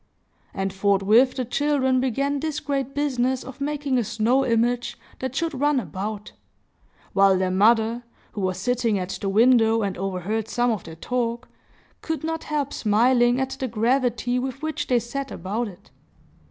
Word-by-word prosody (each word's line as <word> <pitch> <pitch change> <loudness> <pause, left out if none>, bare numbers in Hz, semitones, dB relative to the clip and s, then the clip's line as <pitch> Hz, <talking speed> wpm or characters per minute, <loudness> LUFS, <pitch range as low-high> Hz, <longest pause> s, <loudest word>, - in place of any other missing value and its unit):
And 195 0 -3
forthwith 200 +6 +3
the 255 - -2
children 265 0 +1
began 275 +3 0
this 310 0 -2
great 275 -2 -3
business 260 -3 0
of 265 +1 -11
making 285 -2 0
a - - +1
snow 230 +6 +1
image 240 0 0 0.2
that 260 0 -4
should 330 +1 -1
run 290 -2 +3
about; 205 +2 -5 0.8
while 195 -1 +5
their 185 0 0
mother, 225 +4 +3 0.3
who 205 - -5
was 185 -1 -1
sitting 230 +1 0
at 180 -1 -3
the 195 - -1
window 225 +1 +4
and 195 -2 -2
overheard 195 +3 -2
some 240 +1 +1
of 215 -5 -3
their 160 - -9
talk, 235 +5 -3 0.5
could 320 -1 -3
not 325 0 -3
help 290 -2 -2
smiling 240 +3 +3
at 265 0 -1
the 260 - -1
gravity 245 +2 0
with 265 +3 -5
which 310 -1 -3
they 250 - +3
set 270 +4 -4
about 210 +7 -3
it. 185 -3 -14
240 Hz, 165 wpm, -24 LUFS, 210-265 Hz, 0.8 s, while